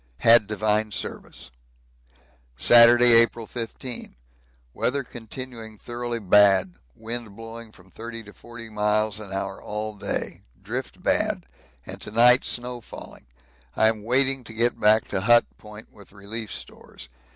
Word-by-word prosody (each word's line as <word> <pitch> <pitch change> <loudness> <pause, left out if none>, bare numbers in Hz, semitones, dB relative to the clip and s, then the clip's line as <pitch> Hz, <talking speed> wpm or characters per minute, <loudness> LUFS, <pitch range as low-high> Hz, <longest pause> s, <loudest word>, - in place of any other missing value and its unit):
Had 115 -2 +6
divine 110 0 -1
service. 60 - -7 1.1
Saturday, 120 - +7
April 115 0 +4
15. 120 - -6 0.6
Weather 140 +2 -1
continuing 115 -2 -9
thoroughly 120 +1 -5
bad. 100 -3 +4 0.2
Wind 115 -2 -6
blowing 115 0 -10
from 95 -2 -21
30 115 +2 -8
to 105 - -14
40 120 -1 -11
miles 105 0 0
an 105 -3 -10
hour 95 0 -5
all 105 +1 -5
day; 105 - -4 0.2
drift - - -7
bad, - - 0 0.4
and - - -9
to - - -6
night 120 +3 +5
snow 125 0 -5
falling. - - -12 0.5
I 110 - +4
am 110 -1 -3
waiting 130 +3 +2
to 115 - -8
get 120 +2 0
back 110 +1 +3
to 95 - -2
Hut 120 +3 +5
Point 105 +1 -13
with 100 -2 -17
relief 105 +2 -6
stores. - - -10
110 Hz, 140 wpm, -24 LUFS, 105-120 Hz, 1.1 s, Saturday